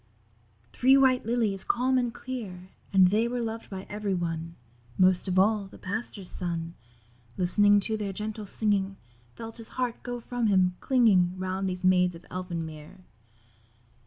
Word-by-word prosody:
Three 265 Hz, +2 st, +5 dB
white 255 Hz, -4 st, +3 dB
Lilies, 220 Hz, -5 st, 0 dB
calm 255 Hz, +1 st, +1 dB
and 245 Hz, -1 st, -1 dB
clear, 200 Hz, -9 st, -7 dB, 0.2 s
And 190 Hz, -2 st, +6 dB
they 220 Hz, +4 st, +2 dB
were 245 Hz, +1 st, -3 dB
loved 225 Hz, -1 st, -4 dB
by 190 Hz, -1 st, -7 dB
every 205 Hz, -2 st, -2 dB
one; 165 Hz, -1 st, -4 dB, 0.4 s
Most 185 Hz, 0 st, +3 dB
of 185 Hz, 0 st, -1 dB
all, 205 Hz, +1 st, +3 dB
the -, -, -14 dB
Pastor's 200 Hz, -1 st, -5 dB
Son, 170 Hz, -2 st, -4 dB, 0.6 s
Listening 205 Hz, +3 st, +5 dB
to 220 Hz, +2 st, -1 dB
their 205 Hz, -2 st, -3 dB
gentle 210 Hz, +1 st, -5 dB
singing, 200 Hz, -2 st, 0 dB, 0.4 s
Felt 225 Hz, 0 st, -8 dB
his 230 Hz, -1 st, -4 dB
heart 250 Hz, -2 st, -2 dB
go 245 Hz, 0 st, -5 dB
from 240 Hz, 0 st, -2 dB
him, 185 Hz, -3 st, +3 dB
clinging 195 Hz, -9 st, +3 dB
Round 185 Hz, +1 st, -2 dB
these 180 Hz, 0 st, -4 dB
Maids 180 Hz, -1 st, +3 dB
of 165 Hz, -, -13 dB
Elfin 180 Hz, -3 st, -4 dB
Mere. 155 Hz, +3 st, -11 dB
195 Hz, 160 wpm, -27 LUFS, 185-230 Hz, 0.6 s, And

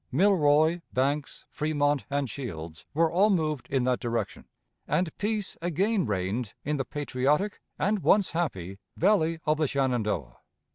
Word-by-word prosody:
Milroy, 160 Hz, 0 st, +4 dB
Banks, 140 Hz, +3 st, -1 dB
Fremont, 145 Hz, -2 st, 0 dB
and 140 Hz, -1 st, 0 dB
Shields 85 Hz, -, -7 dB
were 165 Hz, +1 st, +3 dB
all 195 Hz, +5 st, +4 dB
moved 155 Hz, -, 0 dB
in 135 Hz, -2 st, +1 dB
that 125 Hz, 0 st, +1 dB
direction, 120 Hz, -1 st, -3 dB, 0.4 s
and 175 Hz, -3 st, 0 dB
peace 210 Hz, -1 st, -2 dB
again 185 Hz, -, +1 dB
reigned 105 Hz, +3 st, -2 dB
in 150 Hz, +1 st, 0 dB
the 135 Hz, -, -2 dB
patriotic 145 Hz, +8 st, 0 dB, 0.2 s
and 205 Hz, +2 st, +1 dB
once 195 Hz, +1 st, +3 dB
happy 100 Hz, -, -3 dB, 0.2 s
Valley 165 Hz, -3 st, +3 dB
of 155 Hz, 0 st, +2 dB
the 155 Hz, -1 st, +1 dB
Shenandoah. 110 Hz, -, -1 dB
145 Hz, 140 wpm, -28 LUFS, 125-175 Hz, 0.4 s, Milroy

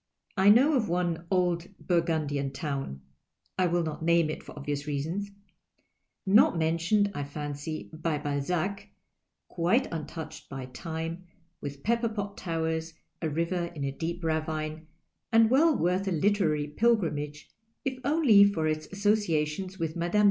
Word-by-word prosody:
I 195 Hz, 0 st, +5 dB
know 260 Hz, +9 st, +6 dB
of 240 Hz, -6 st, +1 dB
one 170 Hz, -1 st, -1 dB
old 175 Hz, -2 st, +1 dB
Burgimdian 155 Hz, -6 st, 0 dB
town 135 Hz, -, -4 dB, 0.3 s
— -, -, -17 dB
I 185 Hz, -, +4 dB
will 175 Hz, 0 st, +1 dB
not 155 Hz, -1 st, -4 dB
name 170 Hz, -1 st, +3 dB
it, -, -, -6 dB
for -, -, -12 dB
obvious 145 Hz, 0 st, -3 dB
reasons— 160 Hz, +8 st, -2 dB, 1.0 s
not 200 Hz, -1 st, +5 dB
men 165 Hz, +1 st, +1 dB
tioned, 205 Hz, +4 st, +2 dB
I 145 Hz, -, -3 dB
fancy, 145 Hz, +2 st, -5 dB
by 160 Hz, -1 st, -1 dB
Balzac, 160 Hz, +7 st, -2 dB, 0.6 s
quite 185 Hz, +10 st, +2 dB
untouched 160 Hz, 0 st, -6 dB
by 135 Hz, -2 st, -5 dB
time, 165 Hz, +5 st, -5 dB, 0.4 s
with 140 Hz, -1 st, -7 dB
pepi)er 230 Hz, 0 st, +1 dB
pot 205 Hz, -1 st, -3 dB
towers, 160 Hz, -1 st, -2 dB, 0.3 s
a 160 Hz, -, 0 dB
river 170 Hz, +3 st, -1 dB
in 145 Hz, -, -4 dB
a 135 Hz, -, -1 dB
deep 170 Hz, +5 st, -4 dB
ravine, 155 Hz, 0 st, -2 dB, 0.4 s
and 225 Hz, 0 st, +5 dB
well 305 Hz, +3 st, +5 dB
worth 180 Hz, +3 st, +1 dB
a -, -, +1 dB
literary 165 Hz, -4 st, +2 dB
pilgrimage 150 Hz, -6 st, 0 dB, 0.3 s
if 260 Hz, -1 st, -2 dB
only 280 Hz, -8 st, +6 dB
for 200 Hz, -6 st, +2 dB
its 155 Hz, 0 st, -1 dB
asso 200 Hz, +1 st, +1 dB
ciations 185 Hz, -1 st, -1 dB
with 160 Hz, -1 st, -2 dB
Mme. 170 Hz, 0 st, -1 dB
165 Hz, 150 wpm, -28 LUFS, 155-195 Hz, 1.0 s, know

